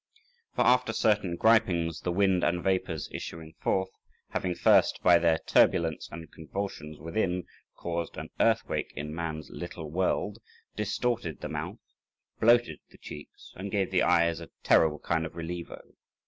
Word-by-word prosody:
For -, -, +3 dB
after 125 Hz, -2 st, +4 dB
certain 105 Hz, -6 st, +2 dB
gripings, 85 Hz, -7 st, +3 dB
the 90 Hz, -, -1 dB
wind 95 Hz, 0 st, +2 dB
and 85 Hz, 0 st, +1 dB
vapours 90 Hz, -5 st, 0 dB
issuing 80 Hz, -1 st, -7 dB
forth, 95 Hz, 0 st, 0 dB, 0.4 s
having 90 Hz, -1 st, -2 dB
first -, -, +4 dB
by 90 Hz, -2 st, +7 dB
their 85 Hz, -2 st, +3 dB
turbulence 85 Hz, -4 st, +3 dB
and 80 Hz, 0 st, -9 dB
convulsions 80 Hz, -2 st, -6 dB
within 90 Hz, +3 st, -1 dB, 0.3 s
caused 85 Hz, -1 st, -4 dB
an -, -, -6 dB
earthquake -, -, +1 dB
in 75 Hz, +1 st, -5 dB
man's 80 Hz, -2 st, -5 dB
little 85 Hz, -3 st, -7 dB
world, 95 Hz, +4 st, 0 dB, 0.4 s
distorted 105 Hz, -4 st, -2 dB
the -, -, -4 dB
mouth, -, -, -4 dB, 0.6 s
bloated 120 Hz, -8 st, +4 dB
the -, -, -18 dB
cheeks, 75 Hz, 0 st, -11 dB
and 100 Hz, +2 st, -5 dB
gave 100 Hz, -2 st, 0 dB
the 90 Hz, -2 st, +3 dB
eyes 85 Hz, -1 st, +3 dB
a 85 Hz, -, -9 dB
terrible 80 Hz, -2 st, +4 dB
kind 80 Hz, +2 st, -1 dB
of 80 Hz, -, -6 dB
relievo. 85 Hz, +1 st, -6 dB
85 Hz, 145 wpm, -29 LUFS, 80-95 Hz, 0.6 s, by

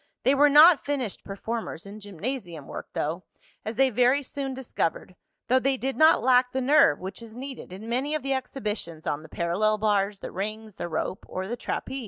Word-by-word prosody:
They 265 Hz, -, +4 dB
were 290 Hz, +1 st, +5 dB
not 305 Hz, +2 st, +8 dB
finished 265 Hz, -8 st, -3 dB
performers 210 Hz, -2 st, -5 dB
in 205 Hz, +2 st, -9 dB
gymnasium 200 Hz, -, -5 dB
work, -, -, -7 dB
though, 160 Hz, +4 st, -2 dB, 0.4 s
as 220 Hz, +2 st, -4 dB
they 265 Hz, +2 st, +3 dB
very 250 Hz, +5 st, +3 dB
soon 270 Hz, 0 st, -5 dB
discovered, 205 Hz, -8 st, -3 dB, 0.3 s
though 255 Hz, +1 st, +4 dB
they 270 Hz, +1 st, +1 dB
did 265 Hz, +2 st, -2 dB
not 315 Hz, -6 st, +5 dB
lack 250 Hz, 0 st, +4 dB
the 265 Hz, -, 0 dB
nerve, 260 Hz, -, +5 dB
which 190 Hz, +4 st, -6 dB
is 225 Hz, -1 st, -11 dB
needed 265 Hz, -5 st, -8 dB
in 195 Hz, +4 st, -9 dB
many 265 Hz, +6 st, 0 dB
of 305 Hz, -, -3 dB
the 275 Hz, 0 st, 0 dB
exhibitions 210 Hz, -, -4 dB
on 145 Hz, -, -2 dB
the 160 Hz, -, -13 dB
parallel 200 Hz, +7 st, 0 dB
bars, 205 Hz, -1 st, +1 dB
the -, -, -8 dB
rings, 215 Hz, +2 st, -5 dB
the 175 Hz, -, -4 dB
rope, 185 Hz, +3 st, -3 dB
or 185 Hz, -, -4 dB
the 235 Hz, -, -3 dB
trapeze. 265 Hz, +2 st, -4 dB
230 Hz, 200 wpm, -26 LUFS, 195-265 Hz, 0.4 s, not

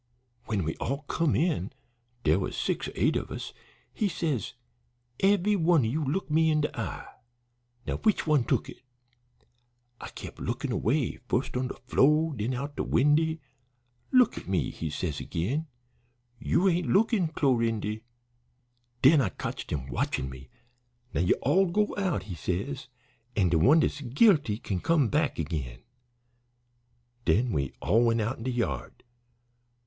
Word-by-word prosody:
When 105 Hz, -5 st, -1 dB
we 80 Hz, 0 st, -2 dB
all 140 Hz, +4 st, -3 dB
come 155 Hz, +1 st, 0 dB
in 155 Hz, -, 0 dB, 0.5 s
dere 80 Hz, +4 st, +3 dB
was 95 Hz, -, -3 dB
six -, -, -1 dB
or -, -, -6 dB
eight -, -, +2 dB
of -, -, -2 dB
us -, -, -6 dB, 0.4 s
he 210 Hz, -, 0 dB
says, 150 Hz, -, -2 dB, 0.7 s
'Eve'y 200 Hz, +1 st, +3 dB
one 170 Hz, -3 st, +4 dB
o' 110 Hz, -, 0 dB
ye 135 Hz, -, -1 dB
look 155 Hz, +6 st, -1 dB
me 160 Hz, +1 st, +4 dB
in 155 Hz, -1 st, +2 dB
de 150 Hz, -, -2 dB
eye; -, -, -4 dB, 0.8 s
now -, -, -2 dB
which 215 Hz, -2 st, +1 dB
one 150 Hz, -5 st, +3 dB
tuk -, -, 0 dB
it?' -, -, -11 dB, 1.2 s
I -, -, -7 dB
kep' -, -, -9 dB
lookin' -, -, -3 dB
away, -, -, 0 dB
fust -, -, -1 dB
on 130 Hz, +1 st, 0 dB
de -, -, -6 dB
flo' 150 Hz, +5 st, +3 dB
an' 140 Hz, -, -7 dB
den 115 Hz, +5 st, -1 dB
out 140 Hz, +3 st, -5 dB
de -, -, 0 dB
windy. 155 Hz, +4 st, +2 dB, 0.7 s
'Look 255 Hz, -2 st, +4 dB
at -, -, -14 dB
me,' 95 Hz, -2 st, 0 dB
he 80 Hz, -, -5 dB
says 75 Hz, 0 st, -3 dB
agin. 135 Hz, -, -2 dB, 0.7 s
'You 180 Hz, +9 st, +2 dB
ain't 175 Hz, -1 st, +1 dB
lookin', 210 Hz, -3 st, +3 dB
Clorindy.' 115 Hz, -8 st, 0 dB, 1.0 s
Den 140 Hz, +2 st, +7 dB
I 115 Hz, -, +1 dB
cotched -, -, -6 dB
him 70 Hz, -4 st, -2 dB
watchin' 65 Hz, 0 st, -2 dB
me. 65 Hz, 0 st, -12 dB, 0.6 s
'Now -, -, +1 dB
you 90 Hz, -, +3 dB
all 185 Hz, +9 st, +4 dB
go 210 Hz, +4 st, +1 dB
out,' 185 Hz, -, -1 dB
he 95 Hz, -1 st, -7 dB
says, 100 Hz, -, -3 dB, 0.5 s
'and 95 Hz, -5 st, +2 dB
de 85 Hz, -, +3 dB
one 150 Hz, -, +6 dB
dat's 145 Hz, -, -1 dB
guilty 145 Hz, -, +3 dB
kin 95 Hz, -5 st, -3 dB
come 150 Hz, -, +2 dB
back 150 Hz, -, 0 dB
agin.' 70 Hz, -7 st, -4 dB, 1.4 s
Den 115 Hz, +9 st, +2 dB
we 70 Hz, -7 st, -1 dB
all 115 Hz, +3 st, +3 dB
went 115 Hz, 0 st, +2 dB
out 115 Hz, +4 st, -2 dB
in -, -, -7 dB
de 130 Hz, -, 0 dB
yard. 115 Hz, -, -3 dB
135 Hz, 165 wpm, -28 LUFS, 100-160 Hz, 1.4 s, Den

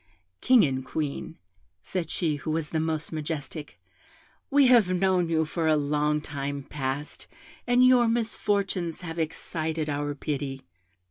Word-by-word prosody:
'King 250 Hz, -3 st, +6 dB
and 130 Hz, -4 st, 0 dB
Queen,' 150 Hz, +3 st, -4 dB, 0.5 s
said 175 Hz, -4 st, -3 dB
she 155 Hz, -5 st, 0 dB
who 155 Hz, -, -6 dB
was 155 Hz, -1 st, -2 dB
the 160 Hz, -, 0 dB
most 160 Hz, -1 st, -2 dB
majestic, 150 Hz, -, -5 dB, 0.7 s
'we 280 Hz, 0 st, +5 dB
have 235 Hz, -7 st, +5 dB
known 185 Hz, -2 st, +2 dB
you 160 Hz, -1 st, +2 dB
for 160 Hz, +1 st, -2 dB
a 155 Hz, -, +5 dB
long 150 Hz, +1 st, +1 dB
time 140 Hz, -1 st, -4 dB
past, 140 Hz, +1 st, -4 dB, 0.4 s
and 245 Hz, +1 st, +5 dB
your 250 Hz, -2 st, +6 dB
misfortunes 200 Hz, -6 st, 0 dB
have 165 Hz, -1 st, -6 dB
excited 160 Hz, -1 st, -2 dB
our 145 Hz, 0 st, -2 dB
pity. 140 Hz, -2 st, -4 dB
160 Hz, 140 wpm, -27 LUFS, 145-180 Hz, 0.7 s, King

